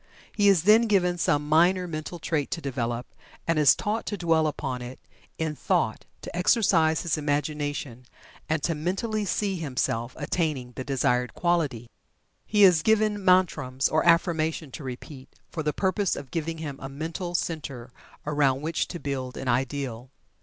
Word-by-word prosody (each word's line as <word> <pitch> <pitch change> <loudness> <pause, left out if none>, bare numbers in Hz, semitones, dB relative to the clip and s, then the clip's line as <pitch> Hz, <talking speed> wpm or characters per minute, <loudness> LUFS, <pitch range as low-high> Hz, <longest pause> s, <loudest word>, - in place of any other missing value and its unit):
He 205 -1 +2
is 185 -5 +4
then 220 +4 +6
given 180 -4 +2
some 150 -2 +1
minor 175 +4 +4
mental 155 +1 -5
trait 155 -3 -2
to - - -3
develop, 120 -4 -3 0.4
and 165 -2 +2
is 145 -3 +6
taught 215 +2 -2
to 205 - -2
dwell 165 -3 +2
upon 130 -4 -3
it 125 +1 -8 0.4
in 160 -1 -2
thought - - 0 0.2
to - - -7
exercise 175 -4 +3
his 165 -2 0
imagination 145 -4 -2 0.4
and 155 -1 0
to 165 - +1
mentally 195 +7 -2
"see" 195 0 -1
himself 130 -5 -2
attaining 145 -5 -2
the 130 - -6
desired 125 -3 0
quality. 150 -10 0 0.6
He 210 -1 +4
is 180 -4 +7
given 215 0 +2
mantrams 155 -8 +2
or 155 0 +2
affirmation 160 -3 +2
to 150 - -8
repeat, 130 +1 -8 0.2
for 160 - -3
the 150 -1 0
purpose 190 +3 0
of 135 -3 -8
giving 165 0 -3
him 145 -4 -6
a 135 - -6
mental 165 +5 -5
center 140 -9 -4 0.3
around 145 -3 +2
which 160 +1 -1
to 175 - -6
build 130 -3 -4
an 135 - -5
ideal. 125 -1 -2
155 Hz, 160 wpm, -26 LUFS, 135-175 Hz, 0.6 s, is